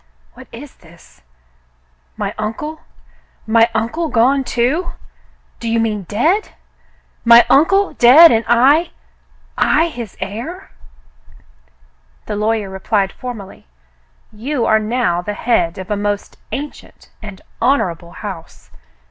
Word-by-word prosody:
"What 260 - -14
is 265 +4 -12
this? 170 0 -20 1.0
My - - -3
uncle 225 +9 -4
.'^ - - -28 0.7
My 230 +1 +3
uncle 240 +10 -1
gone, 260 +3 +2
too.f* 265 +9 -1 0.6
Do 230 - -4
you 230 0 +1
mean 210 -5 -2
dead.? 325 - 0 0.7
My 235 0 +7
uncle 390 +8 +3
dead, 295 +8 +8
and 225 0 +2
I 270 +8 +3 0.3
— - - -35 0.2
I 335 +1 +2
his 235 - -9
heir.? 235 - -7 0.8
" - - -36
The 210 - -4
lawyer 210 -1 -1
replied 195 0 -1
formally, 220 - -9 0.6
"You 240 +4 -3
are 220 - +3
now 215 -6 -1
the 205 +3 -5
head 180 -8 0
of 190 +2 -8
a - - +1
most 205 0 -3
ancient 290 +2 -8
and 205 -3 -10 0.2
honorable 175 -10 0
house. 190 -6 -10
225 Hz, 125 wpm, -17 LUFS, 200-260 Hz, 1.0 s, dead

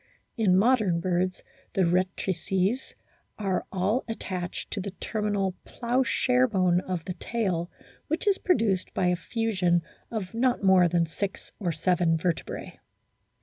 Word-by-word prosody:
In 195 -5 +3
modern 210 -5 +3
birds 180 +1 -1 0.3
the 190 - +4
rectrices 185 +5 0 0.4
are 195 -3 -1
all 195 +6 +1
attached 185 -6 -4
to 205 - -2
the 200 - -4
terminal 205 -1 -1
ploughshare 250 +1 +1
bone 185 -5 +3
of 180 -3 -4
the 185 - -3
tail, 180 -3 -2 0.4
which 320 +7 -1
is 400 -2 +3
produced 220 - +1
by 180 -1 +2
a 180 - +2
fusion 185 -4 0 0.3
of 215 -4 -4
not 245 -1 +1
more 190 -2 +6
than 170 0 +2
six 195 +4 -5
or 180 -5 0
seven 165 +1 +2
vertebrae. 170 0 -3
190 Hz, 135 wpm, -27 LUFS, 180-225 Hz, 0.4 s, more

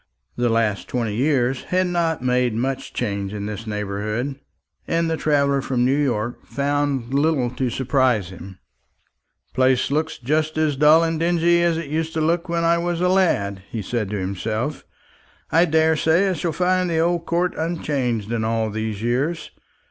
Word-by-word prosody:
The 120 0 +1
last 115 -3 0
twenty 115 -4 -2
years 130 +1 +1
have 185 +1 +1
not 170 -5 -1
made 125 -2 +1
much 130 +3 -2
change 100 -3 -3
in 100 -1 -4
this 105 +1 -6
neighbourhood, 105 +6 -3 0.5
and 165 0 +1
the 165 - 0
traveller 140 -3 +1
from 125 -2 0
New 130 +2 +3
York 120 -5 -1
found 140 -3 -1
little 140 -4 +1
to 125 0 -2
surprise 125 -6 +1
him. 95 +1 -10 0.9
"The - - -42
place 130 0 +2
looks 155 +2 -1
just 155 +5 -1
as 155 -2 +1
dull 150 +4 +6
and 165 -1 -1
dingy 170 0 +3
as 170 -1 +2
it 160 -4 -5
used 160 +1 -2
to - - 0
look 170 +3 0
when 170 0 0
I 170 0 +3
was 175 0 -2
a 180 +1 +2
lad," 100 - +1
he 110 -3 -4
said 110 0 -2
to 105 - -3
himself. 110 +8 -3 0.7
"I 165 +2 +5
daresay 160 +3 +3
I - - 0
shall 170 0 -2
find 180 +2 +1
the 165 - 0
old 170 +1 +1
court 175 +2 +1
unchanged 135 - -2
in 115 -1 -1
all 110 -1 0
these 110 -1 -4
years. 140 +8 -1
140 Hz, 175 wpm, -22 LUFS, 115-165 Hz, 0.9 s, dull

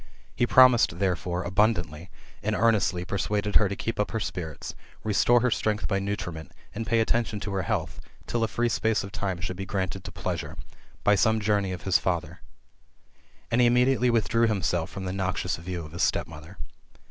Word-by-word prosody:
He 120 - +1
promised, 125 -10 +6
therefore, 90 -1 -1
abundantly, 90 -6 0 0.3
and 110 +1 -1
earnestly 105 -6 +2
persuaded 105 +1 0
her 105 -3 +3
to 100 - -3
keep 115 +2 -4
up 105 - +1
her 115 - -2
spirits, 80 -8 -5 0.3
restore 115 +3 +3
her 125 - +2
strength 105 -5 0
by 100 - 0
nutriment, 100 -5 -5 0.2
and 115 +1 -5
pay 115 0 +3
attention 110 -1 0
to 105 - -4
her 95 - 0
health, - - -2 0.3
till 120 -1 -1
a - - +2
free 120 +2 0
space 110 -2 +1
of 100 - -8
time 95 -3 -3
should 90 0 -4
be 95 - -4
granted 95 -1 -3
to - - -6
pleasure, - - -4 0.5
by 105 - +5
some 110 +2 +3
journey 100 -2 +1
of 90 - -6
his 95 - +3
father; 85 -3 -2 1.1
and 120 +2 +3
he 120 - +6
immediately 125 0 +3
withdrew 115 0 +2
himself 90 -5 0
from 95 -1 -7
the 90 - -3
noxious 95 -1 -2
view 85 0 -5
of 75 - -11
his 85 - -5
stepmother. 80 +4 -2
100 Hz, 185 wpm, -26 LUFS, 90-110 Hz, 1.1 s, promised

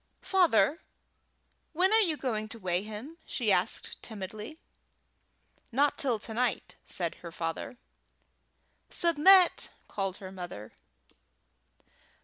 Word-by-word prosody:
"Father, 330 - +3 0.9
when 370 +5 +3
are 445 - +6
you 335 -8 +2
going 220 -5 -2
to 230 - -6
weigh 180 -3 -1
him?" 220 +10 -8
she - - 0
asked - - 0
timidly. 215 +6 -7 1.1
"Not 280 +4 +2
till 255 -5 0
to 220 +1 -6
night," 245 +1 -1
said 170 -3 -3
her 170 - -8
father. 165 +8 -4 1.1
"Submit!" 345 +3 +5 0.2
called 195 -2 -3
her 190 -1 -9
mother. 175 - -8
225 Hz, 110 wpm, -30 LUFS, 190-310 Hz, 1.1 s, are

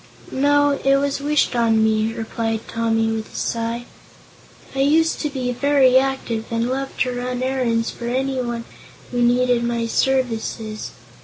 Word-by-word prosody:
"No; 285 +1 +3
it 275 0 +4
was 280 0 -1
wished 295 -3 +1
on 225 -2 +3
me," 220 0 +2
replied 225 0 -3
Tommy, 225 -1 0
with 220 -1 -4
a - - -15
sigh. 230 +1 -2 0.9
"I 270 - -4
used 315 +4 +3
to 300 - -1
be 255 -3 -2
very 260 0 +4
active 265 -4 -2
and 230 0 0
loved 270 +1 -4
to 250 -1 +1
run 250 0 -3
errands 245 -3 0
for 235 - -7
anyone 250 -2 -2 0.5
who 245 -1 -1
needed 245 0 +3
my 235 -1 -1
services. 230 -3 -1
245 Hz, 150 wpm, -21 LUFS, 230-270 Hz, 0.9 s, it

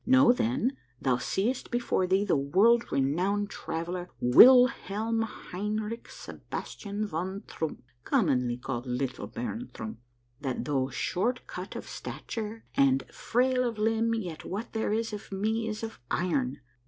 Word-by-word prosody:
Know, 260 -1 +6
then, 250 +2 0 0.2
thou 130 -2 +2
seest 210 - -1
before 240 -6 +1
thee 190 +2 +3
the 190 - +2
world 195 +13 +3
renowned 185 +10 +1
traveller, 175 +2 -4
Wilhelm 225 - +6
Hein 210 -1 -3
rich 220 +2 -4
Sebastian 205 +1 -6
von 190 +2 -3
Troomp, 160 -6 -4 0.2
commonly 130 - +2
called 125 0 -4
'Little 125 +1 -2
Baron 230 - -5
Trump,' 110 +1 -6 0.4
that 130 -3 -3
though 135 -3 0
short 240 - -1 0.3
of - - -6
stature 225 0 -6
and 275 -1 +4
frail 255 +1 +1
of 235 -3 -2
limb, 225 +1 +2
yet 180 -8 -5
what 210 +5 -5
there 220 -1 0
is 225 +1 -1
of 205 - -7
me 220 +3 0
is 215 0 -4
of 225 - -6
iron. 145 -6 0
205 Hz, 140 wpm, -29 LUFS, 155-230 Hz, 0.4 s, Know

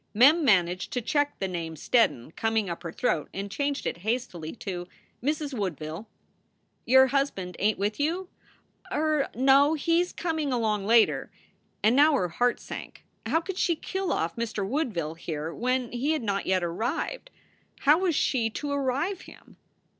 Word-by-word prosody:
Mem 290 +9 +6
managed 180 -6 +2
to 250 - 0
check 290 +4 0
the 195 - -2
name 165 -3 -4
"Steddon" 155 - +1
coming 220 -4 0
up 170 - -6
her 165 - -5
throat 165 -7 -1
and 200 +1 -4
changed 285 +4 -2
it - - -2
hastily 185 -5 -3
to 180 -5 -5 0.3
"Mrs. 295 +2 -1
Woodville." 180 - -4 0.8
"Your 265 +2 +7
husband 265 -10 -1
ain 210 +1 +2
t - - -19
with 205 +4 -1
you?" 340 +6 -1 0.6
"Er, 305 -2 +1
no. 275 +4 +5
He 330 +3 +1
he - - +5
s 355 - -3
coming 320 -5 -2
along 215 -5 0
later." 230 0 +3 0.5
And 220 +3 +4
now 295 +3 +6
her 180 -9 0
heart 245 +9 +1
sank. - - -9 0.2
How 325 - +2
could 375 +2 -5
she 340 - +2
kill 380 +4 -3
off 165 +1 -1
Mr. 220 -4 -2
Woodville 210 - -2
here 160 -1 -5
when 250 0 -1
he 270 +6 0
had 310 - -2
not 200 -2 -1
yet 185 -1 +2
arrived? 235 - -3 0.5
How 295 +4 +5
was 365 -4 +1
she 235 -5 +1
to 285 +6 -4
arrive 285 +7 -1
him? - - -17
240 Hz, 170 wpm, -27 LUFS, 190-290 Hz, 0.8 s, Your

